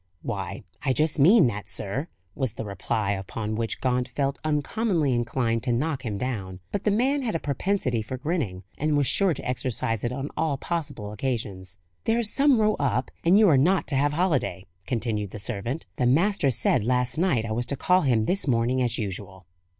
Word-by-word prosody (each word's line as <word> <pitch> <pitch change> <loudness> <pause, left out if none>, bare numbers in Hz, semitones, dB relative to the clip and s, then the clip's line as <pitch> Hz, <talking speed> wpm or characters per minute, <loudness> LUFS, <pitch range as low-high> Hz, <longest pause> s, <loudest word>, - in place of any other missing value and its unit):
"Why, - - -4 0.2
I 130 - +2
just 155 +2 0
mean 180 +5 +7
that, 105 -4 -2
sir," 125 - -1 0.3
was 130 -2 -2
the 110 - -5
reply, 100 +1 -1
upon 105 +2 -3
which 115 0 -2
Gaunt 125 -1 0
felt 135 +3 -2
uncommonly 155 - +1
inclined 120 -1 0
to 125 - -1
knock 135 +2 -1
him 105 -5 -3
down. 100 -7 -4
But 200 - -3
the - - +4
man 260 +7 +2
had 235 -8 -2
a - - +1
propensity 140 - -1
for 130 +4 -5
grinning, 130 - -2 0.2
and 150 0 +1
was 145 - +2
sure 190 +3 +2
to - - -7
exercise 120 -3 -1
it 120 - 0
on 135 +3 -4
all 155 -3 0
possible 145 -11 -4
occasions. 100 -6 -4 0.3
"There's 225 -1 +2
some 275 -4 +4
row 215 0 +3
up, 130 -3 0
and 175 +4 +5
you 215 -1 +6
are 150 -6 +5
not 180 +6 +3
to - - 0
have 145 +2 +2
holiday," 150 - 0 0.2
continued 110 -4 -1
the 105 - -8
servant; 115 +7 -4
"the 125 - +2
master 165 +3 +3
said 125 -1 +2
last 125 +4 0
night 150 -11 +2
I 110 - -4
was 120 +2 -1
to 140 - -1
call 180 +5 +3
him 120 -7 +2
this 190 - 0
morning 125 +1 +2
as 120 -1 0
usual." 95 -3 -5
130 Hz, 195 wpm, -26 LUFS, 115-160 Hz, 0.3 s, mean